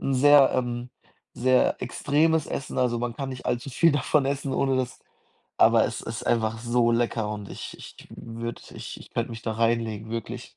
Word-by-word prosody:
'n 135 - -1
sehr, 145 +1 +7
ähm 120 -1 -2 0.4
sehr 130 +1 +2
extremes 150 +5 +1
Essen, 135 - -4
also, 120 -2 +1
man 120 -1 -3
kann 135 -1 -4
nicht 130 -1 -7
allzu 125 +3 -2
viel 165 +4 +4
davon 145 +1 +2
essen, 140 0 -2
ohne 135 0 +1
das 125 -1 -2 0.6
aber - - +6
es - - -5
ist - - -6
einfach 110 -1 +1
so 120 0 +2
lecker 115 -2 0
und 105 -2 -6
ich - - -7
ich - - -11
würde 115 0 -7
ich - - -7
ich - - -14
könnte 115 +1 -2
mich 115 -1 -8
da 110 - -2
reinlegen, 115 -1 0
wirklich. 115 +1 -6
120 Hz, 185 wpm, -26 LUFS, 115-135 Hz, 0.6 s, sehr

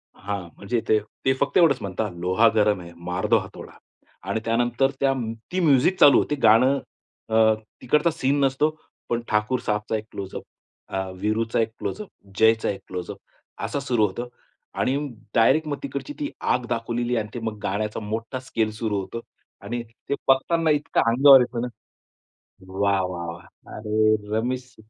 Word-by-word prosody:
हां. 100 -2 -5
म्हणजे 115 +3 -2
ते 110 - +4 0.3
ते 135 - +4
फक्त 140 - +1
एवढंच 165 -7 +5
म्हणतात, 100 +2 -3
"लोहा 90 +6 +3
गरम 105 -3 +3
है, 85 0 -10
मार 90 +3 -4
दो 115 +2 +5
हथौड़ा." 95 0 -10 0.6
आणि 105 +3 0
त्यानंतर 120 +3 +1
त्या 135 -1 +3
म 115 -4 -3 0.2
ती 185 - 0
म्युझिक 160 +2 +3
चालू 140 - +8
होते. 150 - +1
गाणं 130 +6 +5 0.5
अ, 110 - 0 0.5
तिकडचा 150 +6 +2
सीन 145 -2 0
नसतो. 135 +3 +2 0.4
पण 120 0 0
ठाकूरसाबचा 105 0 0
एक 110 - -2
क्लोज-अप, 95 -1 -6 0.4
अ, 95 - -3 0.2
वीरूचा 115 +2 0
एक 110 0 +1
क्लोज-अप, 210 -1 -4 0.3
जयचा 110 0 +4
एक 100 - -3
क्लोज-अप, 90 -1 -6 0.5
असं 145 - -2
सुरू 125 -6 +1
होतं 120 +5 -4 0.5
आणि 130 - +1 0.4
डायरेक्ट 155 +7 +4
मग 145 - -2
तिकडची 140 - -5
ती 290 -1 -2 0.2
आग 125 -1 -1
दाखवलेली 120 +1 -1
आहे 115 - +1
आणि 105 - -10
ते 120 - -4
मग 110 -1 -3
गाण्याचा 105 +3 -2
मोठा 115 +4 -4
स्केल 115 -4 -1
सुरू 105 -3 -1
होतो 95 +5 -6 0.4
आणि 115 +4 -4 0.3
ते 140 - +2
बघतांना 160 +5 +3
इतकं 145 - 0
अंगावर 135 +3 +8
येतं 120 -1 -2
ना. 125 - -2 1.0
वाह, 100 +1 +1
वाह, 85 -1 -5
वाह! 85 0 -12 0.3
अरे! 110 0 +2 0.2
रमेश. 125 +3 -3
115 Hz, 165 wpm, -24 LUFS, 105-135 Hz, 1.0 s, चालू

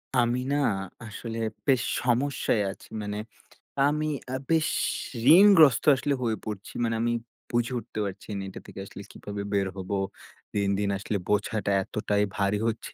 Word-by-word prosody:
আমি 120 0 +3
না - - +2 0.5
আসলে 115 +1 -6 0.3
বেশ 130 -4 +4 0.2
সমস্যায় 125 -3 +1
আছি। - - -14
মানে 105 0 -4 0.7
আমি 150 +1 0 0.3
আ - - 0
বেশ 160 -1 +3 0.7
ঋণগ্রস্ত 165 - +7
আসলে 140 +2 0
হয়ে 110 -2 0
পড়ছি। 105 -2 -6
মানে 115 -1 +1
আমি 120 0 +1 0.4
বুঝে 120 +1 +1
উঠতে 110 - -7
পারছি 100 +2 -7
না - - -3
এটা - - -9
থেকে - - -9
আসলে 100 - -10
কিভাবে 100 0 -6
বের 100 -1 +2
হবো। 95 +2 -3 0.6
দিন, 100 -1 +1
দিন 100 -1 0
আসলে 105 +1 -2
বোঝাটা 105 0 0
এতটাই 105 0 0
ভারী 100 0 +1
হচ্ছে 115 0 -3
110 Hz, 155 wpm, -27 LUFS, 100-125 Hz, 0.7 s, ঋণগ্রস্ত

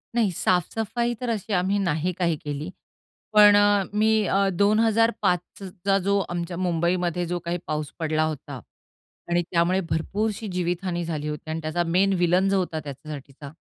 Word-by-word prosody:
नाही 225 -5 +2
साफसफाई 225 +8 0
तर 250 - -2
अशी 215 -2 -2
आम्ही 190 +2 +1
नाही 170 -2 0
काही 170 -2 0
केली. 145 +3 -5 0.6
पण 210 -1 +8
अ, 205 -1 +4
मी 215 +1 +3
अ, 195 +1 +2
2005 215 0 +2 0.2
चा 195 +1 -1
जो 200 0 +3
आमच्या 175 0 -4
मुंबईमध्ये 175 0 0
जो 175 +1 -2
काही 170 +1 -1
पाऊस 150 -2 -3
पडला 155 -1 +1
होता 145 -3 -4 0.7
आणि 175 0 +2
त्यामुळे 175 +2 +2
भरपूरशी 205 +7 -2
जीवितहानी 175 0 -2
झाली 155 -2 -3
होती 150 +1 -6
आणि 160 +1 -3
त्याचा 155 +2 -1
मेन 195 +1 +4
विलेन 180 +3 +3
जो 195 - +2
होता 170 -3 -2
त्याच्यासाठीचा 140 0 -9
180 Hz, 155 wpm, -24 LUFS, 160-200 Hz, 0.7 s, पण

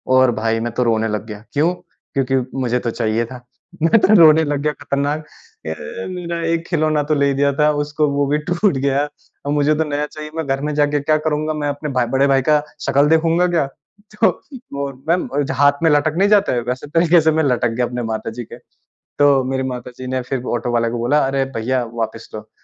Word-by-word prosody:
और 130 -1 +5
भई 115 0 0
मैं 120 +1 -2
तो 125 - 0
रोने 110 -2 +1
लग 105 0 -3
गया। 105 -1 -9
क्यों? 160 +5 +2 0.4
क्योंकि 135 -1 +1 0.2
मुझे 125 -1 0
तो 120 - -3
चाहिए 115 0 0
था। 125 +2 -10 0.4
मैं 165 +8 +5
तो 215 - +4
रोने 160 -1 +7
लग 145 -2 -1
गया 150 0 +1
खतरनाक 145 +1 -1 0.5
"अ, 80 - -1 0.4
मेरा 175 -2 -4
एक 165 0 -1
खिलौना 155 -3 +1
तो 150 +1 0
ले 140 -1 +2
दिया 140 +1 +2
था 150 0 +4
उसको 150 +1 0
वो 140 0 +1
भी 145 +2 +1
टूट 175 -3 +2
गया। 140 +1 +1 0.4
और 145 - -1
मुझे 150 +1 +2
तो 160 - +1
नया 145 +1 -1
चाहिए 150 0 -9
मैं 160 -1 -2
घर 135 0 -1
में 150 +1 -2
जाके 145 0 +2
क्या 155 +2 +2
करूँगा? 155 0 -1
मैं 150 -1 -3
अपने 145 +1 -4
भाई 125 -3 +1
बड़े 135 +1 +4
भाई 135 -1 +3
का 150 -1 +4 0.2
शकल 140 +2 +3
देखूँगा 165 +2 +3
क्या?" 170 -5 +1 0.6
तो 225 - +7 0.5
वो 140 0 -2 0.2
मैम 175 +2 +1 0.2
जो 135 - -3
हाथ 145 +3 +3
में 165 - +5
लटक 150 +1 +2
नहीं 200 +2 +3
जाता 205 -8 +3
है 120 - 0
वैसे 130 +3 -3
तरीके 165 +2 +4
से 160 +1 +3
मैं 160 0 +1
लटक 125 -4 +1
गया 120 +2 -1
अपने 120 0 -4
माता 110 -1 -3
जी 120 +2 -6
के। - - -8 0.6
तो 140 -2 +5
मेरी 130 0 -1
माता 125 -1 -5
जी 130 - -7
ने 130 0 -1
फिर 125 0 -4
ऑटो 120 +1 -3
वाले 115 -1 +1
को 120 - -3
बोला, 120 +6 +2
"अरे 135 0 0
भईया 125 +3 0
वापस 115 -1 -4
लो।" 110 0 -9
140 Hz, 230 wpm, -19 LUFS, 125-155 Hz, 0.6 s, रोने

